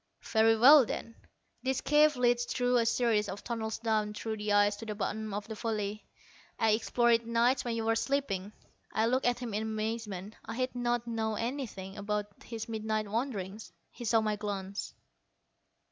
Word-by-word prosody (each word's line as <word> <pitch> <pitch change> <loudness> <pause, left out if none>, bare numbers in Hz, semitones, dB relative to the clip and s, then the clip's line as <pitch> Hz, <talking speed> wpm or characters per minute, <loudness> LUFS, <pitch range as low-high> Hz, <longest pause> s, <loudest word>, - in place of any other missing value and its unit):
"Very 225 0 +3
well, 275 +5 +9
then. 230 0 -5 0.5
This 265 0 0
cave 300 0 +4
leads 240 -1 +2
through 245 0 +1
a 230 -1 +2
series 225 -3 +2
of 195 +2 -6
tunnels 225 -2 -3
down 215 -2 0
through 220 +1 -4
the 210 0 -2
ice 205 0 +4
to 225 - -8
the 210 - -3
bottom 215 +1 -3
of 205 +1 -4
the 220 - -5
valley. 215 -1 -3 0.5
I 225 - +3
explored 235 +2 +3
it 230 0 +1
nights 235 +3 +2
when 235 -2 -2
you 225 - -2
were 225 - +2
all - - +2
sleeping." 225 -7 -1 0.4
I 220 - +1
looked 255 +2 +2
at 245 -1 +2
him 245 -3 -5
in 210 - 0
amazement. 215 -2 -4
I 225 - -6
had 255 +1 -1
not 240 -1 -1
known 220 -2 -2
anything 230 -6 -4
about 210 0 -1 0.2
his 225 -2 -6
midnight 215 -1 -2
wanderings. 215 -4 -3 0.2
He - - -9
saw 225 0 +3
my 215 -1 -1
glance. 200 -1 -5
225 Hz, 185 wpm, -31 LUFS, 210-240 Hz, 0.5 s, well